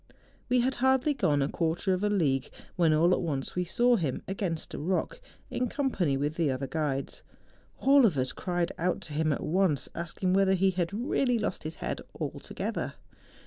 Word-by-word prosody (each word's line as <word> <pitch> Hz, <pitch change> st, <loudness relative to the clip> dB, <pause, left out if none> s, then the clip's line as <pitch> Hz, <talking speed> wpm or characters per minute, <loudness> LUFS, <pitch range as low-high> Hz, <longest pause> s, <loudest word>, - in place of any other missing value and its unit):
We 250 Hz, 0 st, +4 dB
had 260 Hz, +2 st, 0 dB
hardly 265 Hz, +3 st, +3 dB
gone 145 Hz, -, +2 dB
a -, -, +1 dB
quarter 165 Hz, +4 st, 0 dB
of 185 Hz, +2 st, -1 dB
a 210 Hz, -, +2 dB
league, 145 Hz, -10 st, +1 dB, 0.3 s
when 170 Hz, -3 st, +3 dB
all 165 Hz, +4 st, +4 dB
at -, -, +1 dB
once 145 Hz, -6 st, -2 dB
we 180 Hz, 0 st, 0 dB
saw 240 Hz, +7 st, +3 dB
him, 150 Hz, -9 st, -2 dB
against 185 Hz, -4 st, -3 dB
a -, -, -4 dB
rock, 180 Hz, +5 st, -1 dB, 0.3 s
in 250 Hz, -, 0 dB
company 195 Hz, -, 0 dB
with 145 Hz, +3 st, -2 dB
the 165 Hz, -4 st, +2 dB
other 130 Hz, +1 st, -2 dB
guides. 140 Hz, -2 st, -2 dB, 0.6 s
All 275 Hz, -2 st, +6 dB
of 165 Hz, -9 st, -1 dB
us 130 Hz, 0 st, +1 dB
cried 175 Hz, -1 st, -2 dB
out 180 Hz, +2 st, 0 dB
to 155 Hz, -, -7 dB
him 155 Hz, +1 st, +1 dB
at 145 Hz, -, -2 dB
once, 175 Hz, -4 st, +1 dB
asking 175 Hz, +2 st, -2 dB
whether 190 Hz, 0 st, +4 dB
he 190 Hz, +1 st, +3 dB
had 175 Hz, -2 st, -1 dB
really 245 Hz, +3 st, +1 dB
lost 210 Hz, -, -2 dB
his 160 Hz, +1 st, -6 dB
head -, -, -4 dB, 0.2 s
altogether. -, -, -4 dB
175 Hz, 190 wpm, -29 LUFS, 155-205 Hz, 0.6 s, All